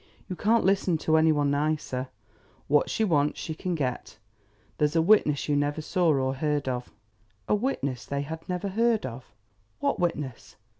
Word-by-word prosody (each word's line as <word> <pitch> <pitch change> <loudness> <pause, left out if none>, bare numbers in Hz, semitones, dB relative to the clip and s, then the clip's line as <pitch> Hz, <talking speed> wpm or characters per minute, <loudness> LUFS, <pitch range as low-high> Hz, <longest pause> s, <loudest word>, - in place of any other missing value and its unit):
You 185 - -4
can't 225 +5 +2
listen 190 -3 +2
to 160 0 +1
any 160 0 +5
one 145 -2 +1
nicer. 145 -3 -1 0.6
What 150 +1 +3
she 220 - 0
wants 150 -7 +1
she 160 - -4
can 180 +2 -3
get. 130 -8 -3 0.6
There's 150 +2 +1
a - - +4
witness 160 -7 +3
you 145 - +1
never 145 +1 0
saw 170 +2 +1
or 135 -2 +1
heard 145 0 -1
of. 125 -1 -3 0.6
A - - +2
witness 200 - -1
they 140 0 -2
had 160 +4 -8
never 180 +2 -2
heard 225 - +1
of! 125 0 -7 0.5
What - - 0
witness? 150 -8 -3
150 Hz, 170 wpm, -27 LUFS, 140-180 Hz, 0.6 s, any